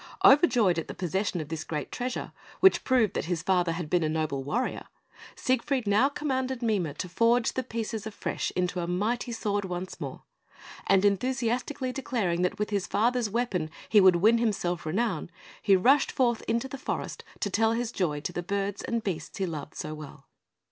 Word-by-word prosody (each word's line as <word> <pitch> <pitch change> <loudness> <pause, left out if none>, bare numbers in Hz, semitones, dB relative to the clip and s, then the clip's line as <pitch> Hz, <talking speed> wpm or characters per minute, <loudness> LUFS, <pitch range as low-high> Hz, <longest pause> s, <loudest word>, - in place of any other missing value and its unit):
Overjoyed 245 - +6
at 165 - -5
the - - -7
possession 185 0 -1
of 155 - -8
this 160 -1 -4
great 150 -3 -4
treasure, 250 0 -3 0.3
which 380 - +5
proved 240 -6 +3
that - - -2
his 170 -2 -2
father 180 -2 +2
had 170 -1 -4
been 175 +3 +2
a 155 - +1
noble 155 -4 -1
warrior, 230 - -2 0.5
Siegfried 255 0 0
now 210 +7 +4
commanded 260 -3 -2
Mime 190 -10 0
to 180 - -4
forge 230 +6 +2
the 260 - -1
pieces 225 -2 -4
afresh 220 - -3
into 180 0 0
a 170 - -2
mighty 220 +8 -1
sword 205 -3 -1
once 180 0 -5
more, - - -6 0.6
and 195 0 +4
enthusiastically 255 +4 0
declaring 220 -10 -1
that 180 - 0
with 210 0 -2
his 200 -3 0
father's 235 0 +1
weapon 200 -8 -1 0.2
he 210 -2 +6
would 185 -2 +7
win 220 +7 +4
himself 180 -7 -1
renown, 190 -1 -1 0.3
he 200 -2 +5
rushed 270 +10 +4
forth 240 -3 +1
into 230 +3 0
the 270 0 -7
forest - - -4 0.2
to 205 - -2
tell 225 +3 +3
his 235 0 -2
joy 160 -9 -1
to 175 - -4
the 175 - -2
birds 200 +2 -2
and 235 -1 -2
beasts 160 -6 -4
he 195 - 0
loved 155 -4 -6
so 155 - -5
well. 150 -2 -10
205 Hz, 190 wpm, -28 LUFS, 175-240 Hz, 0.6 s, would